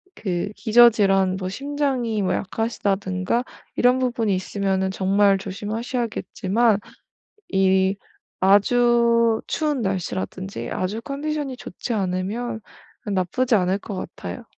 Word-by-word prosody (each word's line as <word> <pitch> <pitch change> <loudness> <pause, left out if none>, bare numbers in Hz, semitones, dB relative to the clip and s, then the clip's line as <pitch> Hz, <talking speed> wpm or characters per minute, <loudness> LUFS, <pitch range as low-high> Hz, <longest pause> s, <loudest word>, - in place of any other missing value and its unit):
그 185 0 -2
기저질환 205 -5 +4
뭐 185 -1 -4
심장이 265 -3 -1
뭐 185 -1 +1
약하시다든가 200 0 -1 0.3
이런 250 +1 +4
부분이 235 -5 0
있으면은 190 0 -1
정말 195 +1 +3
조심하셔야겠지만 215 +1 -1 0.7
이 190 0 +3 0.4
아주 235 +3 +4
추운 300 -4 -1
날씨라든지 190 0 -3
아주 200 +5 -2
컨디션이 285 0 -3
좋지 240 - -5
않으면 210 +4 -2 0.5
나쁘지 205 +5 +1
않을 185 -1 +2
것 200 -1 -7
같아요. - - -7
205 Hz, 265 characters per minute, -23 LUFS, 190-240 Hz, 0.7 s, 기저질환